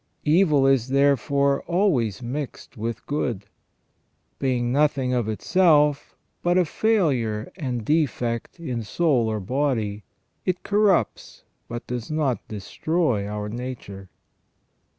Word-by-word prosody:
Evil 150 -3 +4
is 135 -3 +3
therefore 140 +1 +2
always 145 - +1
mixed 135 +3 -6
with 115 +1 -4
good; 120 -9 -2 0.9
being 125 -3 0
noth 145 +1 +3
ing 130 -1 0
of 120 -3 0
itself 150 - +2 0.3
but 175 +1 +2
a 180 - +4
failure 140 - 0
and 125 - -3
defect 125 -3 -1
in 125 -8 -3
soul 125 0 +1
or 110 -1 -1
body, 110 -3 -1 0.4
it 185 -1 -2
corrupts 205 -2 +1 0.2
but 120 +1 -6
does 120 -2 -5
not 145 -8 0
destroy 110 - -1
our 105 0 -4
nature. 105 -5 -7
130 Hz, 115 wpm, -24 LUFS, 115-150 Hz, 0.9 s, Evil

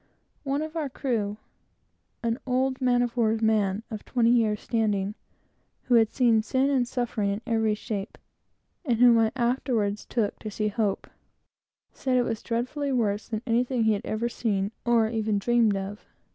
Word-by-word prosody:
One 280 +1 -1
of 315 +1 -7
our 305 -4 -2
crew, 225 -6 -2 0.9
an 230 +2 0
old 260 +1 0
man 245 -1 +3
of 240 -1 -3
war's 225 -2 +2
man, 210 -2 +1
of 215 -2 -6
twenty 235 -2 +2
years' 220 -3 +2
standing, 210 -3 0 0.7
who 250 - 0
had 225 -2 +5
seen 235 -4 +3
sin 265 +5 +1
and 255 -3 +2
suffering 235 -5 -1
in 200 +2 -2
every 225 -3 +1
shape, 210 -2 -5 0.7
and 245 -8 +1
whom 240 -1 +6
I 220 -1 +3
afterwards 235 -4 0
took 220 -4 -1
to 215 - -6
see 210 +1 -1
Hope, 210 -2 -1 0.9
said 260 -1 0
it 245 - +3
was 225 -2 -3
dreadfully 255 +5 -2
worse 215 -5 0
than 220 0 -4
anything 245 0 +1
he 220 0 +4
had 205 - -2
ever 225 +1 -2
seen, 205 -4 -1
or 235 -2 +3
even 220 -2 -1
dreamed 225 -1 +2
of. 195 +2 -6
230 Hz, 170 wpm, -26 LUFS, 215-245 Hz, 0.9 s, whom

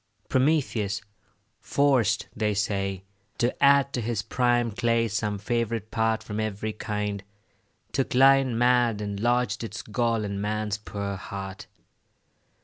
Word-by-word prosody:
Prometheus, 130 -8 +1 0.6
forced, 120 -7 +2
they 105 -1 0
say, 95 -2 -1 0.3
to 120 +1 +1
add 140 0 +5
To 125 - -1
his 110 -2 -2
prime 120 -1 +1
clay 115 +1 +1
some 105 -1 -2
favourite 115 0 -2
part 110 0 +1
From 105 0 -5
every 110 0 -2
kind, 105 -2 -3 0.7
took 135 -2 -1
lion 135 -2 +5
mad, 120 -2 +3
And 100 -1 -4
lodged 120 +2 +1
its 110 -1 -6
gall 115 0 0
in 100 -1 -3
man's 105 0 -2
poor 100 -2 -4
heart. 95 0 -7
110 Hz, 130 wpm, -26 LUFS, 105-120 Hz, 0.7 s, add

